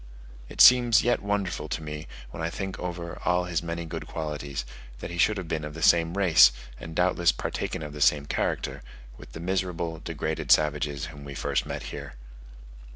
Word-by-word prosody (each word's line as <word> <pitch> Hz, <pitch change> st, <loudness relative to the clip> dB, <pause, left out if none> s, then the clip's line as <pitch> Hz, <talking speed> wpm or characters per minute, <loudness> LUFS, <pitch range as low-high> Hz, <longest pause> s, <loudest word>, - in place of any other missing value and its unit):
It -, -, 0 dB
seems 120 Hz, -2 st, +7 dB
yet 120 Hz, -, +1 dB
wonderful 100 Hz, -6 st, -2 dB
to 80 Hz, -, -3 dB
me, 75 Hz, 0 st, -6 dB, 0.2 s
when 75 Hz, -, -7 dB
I 80 Hz, -, -1 dB
think 95 Hz, +2 st, -5 dB
over 85 Hz, -1 st, -6 dB
all 90 Hz, 0 st, +2 dB
his 85 Hz, -3 st, -2 dB
many 85 Hz, 0 st, -4 dB
good 80 Hz, -, -6 dB
qualities 75 Hz, -5 st, -4 dB, 0.3 s
that -, -, -7 dB
he 85 Hz, -, -6 dB
should 105 Hz, +4 st, +3 dB
have 95 Hz, -3 st, -5 dB
been 80 Hz, -1 st, -2 dB
of 75 Hz, 0 st, -7 dB
the 80 Hz, -, -5 dB
same 85 Hz, +1 st, +4 dB
race, 85 Hz, -9 st, +7 dB, 0.3 s
and 80 Hz, 0 st, -9 dB
doubtless 90 Hz, -1 st, +3 dB
partaken -, -, -4 dB
of 75 Hz, -1 st, -7 dB
the 75 Hz, -, -8 dB
same 70 Hz, 0 st, +4 dB
character, -, -, -2 dB, 0.4 s
with -, -, -13 dB
the -, -, -7 dB
miserable, 85 Hz, -2 st, -2 dB
degraded 80 Hz, -1 st, -3 dB
savages 75 Hz, -1 st, +2 dB
whom 70 Hz, -1 st, -11 dB
we 70 Hz, -1 st, -8 dB
first -, -, -1 dB
met -, -, -5 dB
here. -, -, -8 dB
80 Hz, 190 wpm, -27 LUFS, 75-90 Hz, 0.4 s, seems